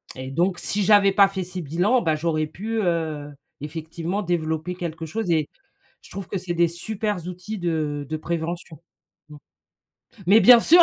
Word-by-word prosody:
Et 130 +1 -7
donc, 175 +5 +1
si 205 0 0
j'avais 200 0 +5
pas 200 0 +6
fait 190 -1 -4
ces 180 +1 -6
bilans, 175 - +1
bah, 160 -5 +1
j'aurais 155 0 0
pu, 220 +8 -4
heu, 160 -5 -1 0.3
effectivement 165 +5 -4
développer 165 -1 -2
quelque 165 -2 -5
chose 180 +3 -3
et 155 -2 +2 0.5
je - - -17
trouve 195 -2 -6
que - - -3
c'est 180 -1 -3
des 170 0 +3
super 210 +4 -3
outils 180 +4 -6
de 155 -4 -2
de 155 - -2
prévention. 165 -1 -4 0.5
Mmh. 150 - -11 0.9
Mais 205 +5 +7
bien 240 0 +9
sûr, 345 +7 +8
175 Hz, 170 wpm, -23 LUFS, 160-195 Hz, 0.9 s, bien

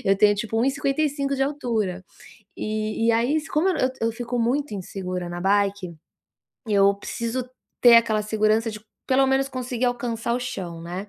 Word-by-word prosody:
eu 195 0 +3
tenho 205 0 +5
tipo 225 +2 -3
1 230 - +2
e 270 - +3
55 280 0 -1
de 270 - +1
altura. 230 -10 -2 0.5
E 215 +1 -2
e 230 - +5
aí 240 +7 +2
s 315 +1 -3
como 320 +6 +2
eu 370 - +2
nã - - -2
eu 255 - +2 0.2
eu 230 - -3
fico 240 +1 -4
muito 245 +1 0
insegura 185 -2 -5
na 175 0 -5
bike, 200 -2 +1 0.7
eu 200 -1 +4
preciso 235 +5 -4 0.3
ter 240 -1 +9
aquela 220 -2 +3
segurança 215 +1 +1
de 215 -1 -8 0.3
pelo 270 +1 +3
menos 270 +1 +1
conseguir 255 -1 -3
alcançar 235 -1 -2
o 250 - -1
chão, 175 -8 -5
né. 180 +4 -6
230 Hz, 190 wpm, -24 LUFS, 205-260 Hz, 0.7 s, ter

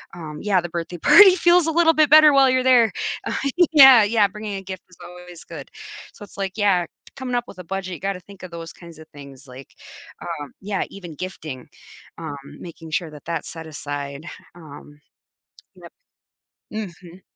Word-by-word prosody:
um 155 -3 -9
yeah, 195 -3 +1
the 175 - -7
birthday 170 +1 -6
party 380 - +7
feels 345 -1 +3
a - - +1
little 325 0 +3
bit 310 -2 +3
better 305 0 +7
while 270 -1 +5
you're 255 0 +1
there. 245 -4 +4 0.3
Uh, - - -3 0.4
yeah. 270 -6 +9
yeah, 210 0 +2
bringing 210 +1 -7
a 195 - -6
gift 185 -1 -8
is 180 - -20
always 180 -1 -13
good. 155 -5 -10 0.4
So - - -13
it's 205 - -15
like, 195 -1 -3
yeah, 195 -4 +2 0.3
coming 260 -2 -4
up 240 - 0
with 185 - -13
a - - -8
budget, 190 +1 -5
you 165 - -8
gotta 195 -1 -4
think 200 +2 -16
of 185 - -9
those 165 -1 -9
kinds 170 -2 -14
of 160 - -14
things, 140 -1 -14
like, 130 +1 -13 0.7
um 145 - -12
yeah, 200 -1 -3
even 175 -5 -10
gifting, 155 -7 -8 0.5
um, 160 -3 -6 0.2
making 165 -2 -11
sure 165 +1 -2
that 150 -1 -14
that's 165 -2 -4
set 165 0 -9
aside. 145 -1 -7 0.3
Um, 145 -2 -14 0.8
yep. - - -14 0.8
Mhm. 180 -4 -8
180 Hz, 185 wpm, -21 LUFS, 160-215 Hz, 0.8 s, yeah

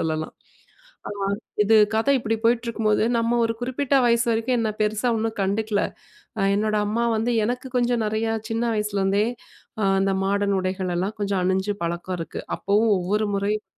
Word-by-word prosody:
சொல்லலாம். 155 -1 -2 0.8
அ - - -5 0.5
இது 220 +2 +4 0.2
கதை 250 +6 +3
இப்டி 225 -2 -1
போயிட்டுருக்கும்போது 230 -2 +2
நம்ம 230 +1 +1
ஒரு 230 - 0
குறிப்பிட்ட 260 +3 -1
வயசு 235 0 +3
வரைக்கும் 230 +2 +1
என்னை 220 -2 0
பெருசா 215 +3 +1
ஒண்ணும் 225 +1 -2
கண்டுக்கல. 205 +1 0 0.6
அ - - 0 0.2
என்னோட 215 0 0
அம்மா 225 +3 0
வந்து 225 +3 0 0.2
எனக்கு 250 +2 -3
கொஞ்சம் 240 -2 +1
நெறையா 220 +1 -1 0.2
சின்ன 225 +1 -1
வயசிலிருந்தே 205 -1 +1 0.6
ஆ - - 0 0.2
அந்த 195 0 +2
மாடன் 200 0 +1
உடைகளெல்லாம் 185 +2 -2
கொஞ்சம் 200 -2 0
அணிஞ்சு 190 +2 0
பழக்கம் 175 +2 -3
இருக்கு. 165 - -5 0.2
அப்பவும் 210 +2 +2
ஒவ்வொரு 205 +4 0
முறையும் 210 +2 -1
215 Hz, 150 wpm, -23 LUFS, 195-230 Hz, 0.8 s, இது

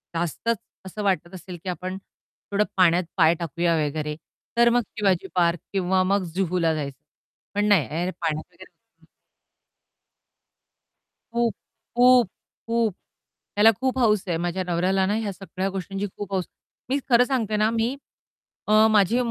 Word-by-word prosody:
जास्तच 175 +7 -1 0.3
असं 210 +3 -6
वाटत 185 -3 0
असेल 180 0 -8
की 190 - -4
आपण 185 +1 -4 0.5
थोडं 200 +1 +3
पाण्यात 180 -1 +4
पाय 165 -2 +6
टाकूया 170 +1 0
वगैरे, 150 +1 -3 0.4
तर 235 0 +6
मग 245 +1 +3 0.2
शिवाजी 190 -3 +1
पार्क 170 -1 +2
किंवा 190 -1 +2
मग 195 +1 +1
जुहूला 180 -3 +1
जायचं. 140 -3 -4 0.6
पण 205 0 +2
नाही, 175 -1 +2
पाण्यात 155 -2 -1
वगैरे - - -19 2.3
खूप, 235 -1 +1 0.4
खूप, 250 -2 +6 0.4
खूप 230 -3 +1 0.6
त्याला 210 +2 +7
खूप 260 0 0
हौस 215 -5 +3
आहे, 170 -2 0
माझ्या 175 +2 -2
नवऱ्याला 185 +2 +1
ना, 200 - 0
ह्या 215 -2 -2
सगळ्या 190 0 -4
गोष्टींची 195 +1 -4
खूप 205 -1 -6
हौस. 185 -2 0 0.4
मी 270 - +2
खरं 240 0 +6
सांगते 230 -5 -1
ना, 215 +1 +3
मी 230 +3 0 0.7
अ, 215 +1 +6
माझी 210 +2 +4
190 Hz, 140 wpm, -24 LUFS, 175-215 Hz, 2.3 s, त्याला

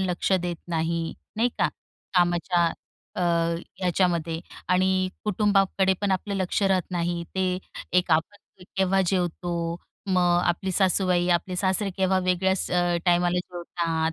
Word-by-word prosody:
लक्ष 185 0 0
देत 175 -2 0
नाही, 165 0 -1 0.2
नाही 235 +3 +3
का? - - +3 0.5
कामाच्या 175 0 +3 0.5
अ, - - 0 0.6
याच्यामध्ये 170 -3 +1 0.3
आणि 185 +1 +2 0.2
कुटुंबाकडे 195 -2 +2
पण 205 -1 0
आपलं 200 +2 -2
लक्ष 190 +1 -1
राहत 190 -2 +3
नाही, 175 -1 -1
ते 185 -1 0 0.4
एक 180 -1 -1
आपण 180 +4 -2
केव्हा 190 0 +3
जेवतो 175 -1 -1 0.5
मग 180 -2 +3
आपली 175 +2 0
सासूबाई, 180 -1 +2
आपले 180 +2 -6
सासरे 190 +2 +1
केव्हा 190 -1 +2
वेगळ्याच 190 +1 +1
अ, 175 -1 +2
टायमाला 175 0 +3
जेवतात, 170 -2 -2
180 Hz, 125 wpm, -25 LUFS, 175-190 Hz, 0.6 s, नाही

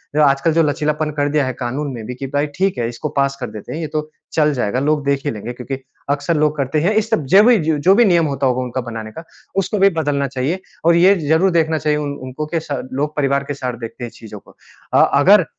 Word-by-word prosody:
जो 155 - +4
आजकल 140 +3 +3
जो 165 +1 +4
लचीलापन 150 +1 -1
कर 145 0 +1
दिया 145 -1 +1
है 130 - -2
कानून 135 +3 -3
ने 115 - -7
भी 125 +3 -6
कि 135 +2 -5
भाई 145 +1 +1
ठीक 190 -4 +1
है 115 - 0
इसको 120 +6 -5
पास 140 0 +2
कर 125 - -3
देते 105 -1 -8
हैं। 155 - -4
ये 155 - -3
तो 155 0 -2 0.2
चल 150 -2 +3
जाएगा 125 -2 -1
लोग 145 +1 0
देख 140 0 0
ही 145 - 0
लेंगे 115 +2 -6
क्योंकि 130 +2 -6 0.3
अक्सर 145 +3 0
लोग 150 0 +1
करते 140 +2 0
हैं। 185 +7 +2
इस 225 - -11
सब 160 -11 0
जभी 210 - +6
जो 160 -1 0
भी 150 - -1
जो 190 +5 +5
भी 240 - +5
नियम 170 -4 +3
होता 140 -1 0
होगा 130 0 0
उनका 125 +1 -3
बनाने 110 -1 -6
का, 165 - -9 0.3
उसको 195 +2 0
भी 195 +1 +6
बदलना 140 -2 0
चाहिए 140 +8 -2 0.2
और 170 0 +5
ये 185 +4 +6
ज़रूर 165 +5 +3
देखना 160 -2 +2
चाहिए 150 -1 0
उन 145 -1 -3
उनको 130 +4 -5
के - - +2
सा 150 -2 -4
लोग 145 +3 -2
परिवार 140 -1 +1
के 145 - -4
साथ 125 -3 -4
देखते 115 - -9
हैं 120 - -5
चीज़ों 105 -2 -11
को। - - -21 0.4
अ, - - +6
अगर - - +6
145 Hz, 260 wpm, -19 LUFS, 130-160 Hz, 0.4 s, जभी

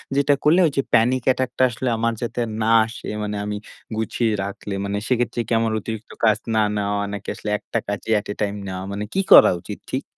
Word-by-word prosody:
যেটা 140 +1 +3
করলে 155 +5 +5 0.2
যে, 135 - +4
panic 120 +2 +3
attack 130 -1 -1
টা - - +4
আসলে 125 +2 -2
আমার 115 +1 0
যাতে 120 0 -3 0.2
না 110 - +1 0.2
আসে? 115 - -9 0.2
মানে, 105 0 -3
আমি 105 0 -3 0.4
গুছিয়ে 110 0 0
রাখলে, 100 0 -6
মানে 100 +1 -2
সেক্ষেত্রে 120 -1 0
কি - - -10
আমার 115 -1 0
অতিরিক্ত 110 +1 -7
কাজ 110 -1 +4 0.2
না - - +4 0.2
নেওয়া, 100 0 -1
নাকি 100 -1 -7
আসলে 105 -1 -6
একটা - - -4
কাজেই 105 +2 -2
at 105 - -11
a - - -2
time 105 0 -1
নেওয়া 95 0 -5
মানে, 100 +1 -3
কি 195 - +2
করা - - +10
উচিত, - - -7
ঠিক? - - -1
110 Hz, 210 wpm, -22 LUFS, 105-120 Hz, 0.4 s, করা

